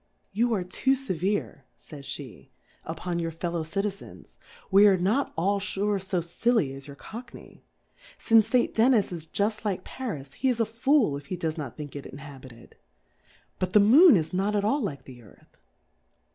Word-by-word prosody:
You 235 +4 +1
are 190 - -1
too 225 +9 0
fevere^/^n'j'/^e'jUpon 160 - -5
your 165 - -2
Fellow 170 +1 -3
Citizens; 195 +5 -6 0.3
we 200 +2 +7
are 195 -2 +5
not 210 +10 0
all 200 +4 +1
fure 200 +1 -1
fo 190 -2 -1
filly 175 - 0
as 135 +1 -9
your 140 - -10
Cockney; 235 - -11 0.5
fince 225 -2 +4
St. 250 -1 +1
Dennis 225 -3 +3
is 165 -2 -6
juft 210 +5 -1
like 195 -4 -2
Faris^, 150 - -6
he 265 - 0
is 240 -2 0
a 230 - +3
Fool 230 - +2
if 140 -1 -12
he 185 - -3
does 160 -2 -2
not 145 -7 -7
think 145 -2 -8
it 140 - -7
inhabited: 135 -4 -12 0.8
But 185 0 -2
the 210 - +7
Moon 260 - +7
is 160 +2 -3
not 195 +3 0
at 205 0 +1
all 280 +7 +1
like 140 - -4
the 125 -2 -13
Earth. 105 - -21
185 Hz, 165 wpm, -27 LUFS, 150-220 Hz, 0.8 s, we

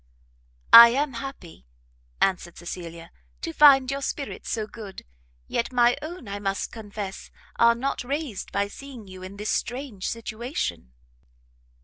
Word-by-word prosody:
"I 235 0 +13
am 275 +3 0
happy," 230 - -9 0.5
answered 180 -3 0
Cecilia, 170 -1 -8 0.3
"to 330 - -4
find 275 -4 +7
your 275 0 -3
spirits 275 0 -5
so 220 -2 -1
good; 210 -3 -10 0.4
yet 235 - -1
my 245 -1 +4
own, 315 - -8
I 200 0 -5
must 195 -1 -2
confess, 205 -3 -7 0.3
are 235 0 +5
not 270 +3 -2
raised 275 -5 -4
by 200 0 0
seeing 250 -1 -11
you 185 -1 -11
in 185 +2 -9
this 210 +1 -2
strange 245 -6 -3
situation." 220 - -4
230 Hz, 135 wpm, -25 LUFS, 195-270 Hz, 0.5 s, I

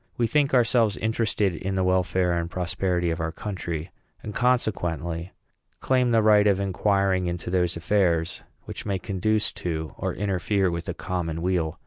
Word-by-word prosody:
We 120 - +2
think 140 +4 +2
ourselves 115 -3 +3
interested 110 -3 0
in 95 +4 -3
the 95 - +1
welfare 90 -1 +1
and 85 0 -1
prosperity 90 -1 -1
of 80 +1 -3
our 80 0 -2
country; 85 -4 -5 0.3
and, 105 - -6
consequently, 90 -9 0 0.5
claim 130 -1 +2
the 115 -2 +3
right 105 -1 +5
of 100 -2 +3
inquiring 95 -1 +1
into 85 0 -4
those 90 -2 +1
affairs 85 -2 +1 0.2
which - - -7
may 100 -2 -1
conduce 105 +3 0
to 80 -2 -3
or - - -2
interfere 95 -1 0
with 85 0 -4
the 90 - -4
common 85 -3 -3
weal. 85 -3 0
95 Hz, 160 wpm, -25 LUFS, 85-105 Hz, 0.5 s, right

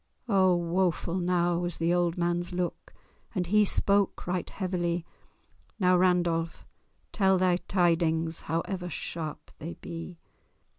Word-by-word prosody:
Oh! 190 -4 +4
woeful 175 +1 0
now 175 -1 +1
was 175 -1 -2
the 165 +1 +1
old 175 -1 +1
man's 175 +1 -1
look, 180 -1 -3 0.4
And 180 -2 0
he 210 +4 +4
spake 200 0 +1
right 180 0 -2
heavily— 175 -3 -2 0.7
"Now, 180 -2 +4
Randolph, 175 -2 +1 0.5
tell 190 -2 +3
thy 180 -1 +3
tidings, 165 -3 +1
However 180 +3 -2
sharp 160 -3 -6
they 165 +3 -6
be! 165 +1 -8
175 Hz, 120 wpm, -28 LUFS, 170-185 Hz, 0.7 s, Oh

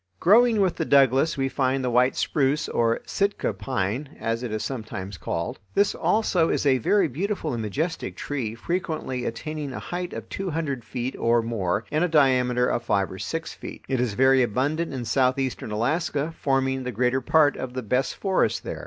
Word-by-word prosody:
Growing 225 +4 +5
with 185 -3 +1
the 165 - 0
Douglas 140 +1 +4
we 135 0 +1
find 135 0 0
the 125 - 0
white 125 +2 +3
spruce, 145 +1 +1
or 115 0 +1
"Sitka 200 0 0
pine," 130 +4 -3
as 115 +1 -1
it 125 -3 -4
is 110 0 -2
sometimes 105 -6 -5
called. 85 0 -4 0.2
This 200 0 +3
also 185 -6 +2
is - - 0
a 130 -2 +4
very 190 - +3
beautiful 165 - -2
and 115 - -2
majestic 150 - -3
tree, 120 -7 -3
frequently 155 -3 -3
attaining 145 +4 -4
a - - -5
height 180 0 -4
of - - -6
two 195 -1 -4
hundred 145 -6 -3
feet 125 +2 -4
or 115 0 +3
more 105 -3 -1
and 155 +2 +1
a - - +3
diameter 130 -5 +3
of 120 - 0
five 100 -1 0
or 95 - -8
six 160 - -4
feet. - - -10
It 130 -2 0
is 120 -5 0
very 130 +1 +5
abundant 140 +8 0
in 130 -3 -4
southeastern 130 -2 0
Alaska, 145 +7 -1
forming 135 -1 0
the 125 - -3
greater 125 +3 +1
part 145 +2 +4
of 130 -1 -6
the 130 - -3
best 125 +5 0
forests 190 -2 +1
there. - - -6
130 Hz, 190 wpm, -25 LUFS, 120-155 Hz, 0.2 s, Growing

